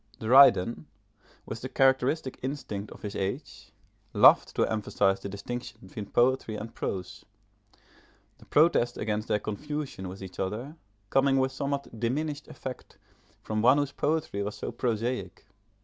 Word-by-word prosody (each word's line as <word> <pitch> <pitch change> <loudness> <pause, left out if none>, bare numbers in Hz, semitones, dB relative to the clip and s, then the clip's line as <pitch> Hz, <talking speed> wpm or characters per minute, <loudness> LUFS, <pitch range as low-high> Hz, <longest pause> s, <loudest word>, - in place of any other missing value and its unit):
Dryden, 120 - +5 0.6
with 110 +1 -6
the 130 - -5
characteristic 130 +1 +2
instinct 125 -7 -4
of - - -13
his 105 -1 -5
age, 95 0 -4 0.4
loved - - +6
to - - +3
emphasise 100 -2 +1
the 100 - -6
distinction 115 +4 -6
between 100 +2 -7
poetry 120 -2 +2
and 110 +2 -7
prose, 100 +1 -5 1.2
the - - -17
protest 145 -6 +3
against 105 0 -2
their - - +2
confusion 130 -2 -5
with 95 +1 -9
each 95 -1 -10
other, 110 +11 -3 0.4
coming 135 0 +3
with 130 0 +2
somewhat 140 -3 -4
diminished 145 +5 -2
effect 130 -1 -8 0.5
from 110 0 -1
one 125 +5 +6
whose 145 -1 0
poetry 150 -9 -1
was 105 +1 -3
so - - -5
prosaic. 120 +1 -2
120 Hz, 140 wpm, -28 LUFS, 105-135 Hz, 1.2 s, loved